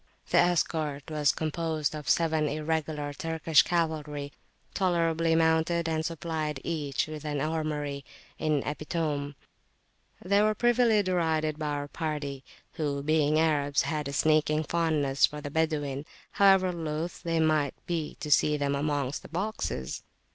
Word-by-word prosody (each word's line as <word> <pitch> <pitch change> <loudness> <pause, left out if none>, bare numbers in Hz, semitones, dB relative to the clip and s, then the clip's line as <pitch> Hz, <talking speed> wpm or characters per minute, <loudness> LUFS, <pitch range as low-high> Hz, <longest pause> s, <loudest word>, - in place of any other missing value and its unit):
The - - +5
escort 160 -4 0
was 150 -2 +3
composed 160 -1 -2
of 150 -3 -5
seven 160 -2 +2
Irregular 155 -1 -2
Turkish 160 +1 +3
cavalry, 150 -4 -2 0.4
tolerably 165 -3 +1
mounted, 160 +1 +2
and 160 -1 0
supplied 160 -3 -3
each 150 -5 -1
with 155 -1 -7
an 150 -2 -2
armoury 150 -2 -2 0.4
in 150 -3 +1
epitome. 150 -2 -2 0.8
They 200 +3 +2
were 215 0 +2
privily 240 -2 +3
derided 160 -4 0
by 155 - -2
our 145 -1 -2
party, 145 -4 -4 0.3
who, 145 -3 -1
being 155 0 +2
Arabs, 145 -3 +2
had 150 -3 -2
a 140 - -5
sneaking 155 +1 +2
fondness 155 -5 +2
for 150 - -8
the 145 -1 -6
Badawin, 145 -3 -1 0.3
however 195 -2 +5
loth 165 0 -4
they 165 -2 0
might 155 -3 +2
be 165 -3 -3
to 150 - -4
see 150 +1 +4
them 140 -1 0
amongst 145 -1 -1
the - - -13
boxes. 175 - -3
155 Hz, 140 wpm, -28 LUFS, 145-165 Hz, 0.8 s, The